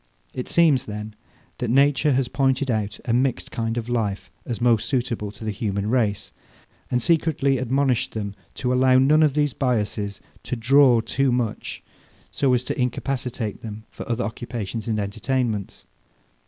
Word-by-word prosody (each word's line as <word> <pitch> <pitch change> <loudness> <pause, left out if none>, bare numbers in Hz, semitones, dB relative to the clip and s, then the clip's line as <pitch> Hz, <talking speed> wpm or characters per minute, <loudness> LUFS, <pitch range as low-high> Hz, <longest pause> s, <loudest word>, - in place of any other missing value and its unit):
It 125 - -5
seems, 150 -6 +4
then, 105 0 -6 0.5
that 120 - -2
nature 140 +3 +4
has 130 -1 +1
pointed 135 +1 +1
out 105 -2 -2
a 120 - 0
mixed 130 +1 0
kind 115 0 -2
of 115 -1 -3
life 110 -5 -2 0.2
as 120 - -3
most 115 -2 +3
suitable 120 -5 -1
to 110 +1 -10
the 110 - -1
human 100 0 -2
race, 110 -5 0 0.6
and 125 - +1
secretly 155 -5 +2
admonished 130 0 +1
them 100 -2 -3 0.2
to 125 -1 -1
allow 130 0 +5
none 145 +4 +5
of 150 -3 +3
these 145 -3 +1
biasses 105 -5 -1 0.2
to - - -4
draw 125 0 +5
too 135 +3 0
much, 120 -3 -2 0.5
so 135 -2 +1
as 125 - -1
to 125 - -3
incapacitate 125 -3 -2
them 110 -1 -7
for - - -9
other 120 +1 0
occupations 115 0 -5
and 110 -2 0
entertainments. 110 0 -2
120 Hz, 160 wpm, -23 LUFS, 110-135 Hz, 0.6 s, allow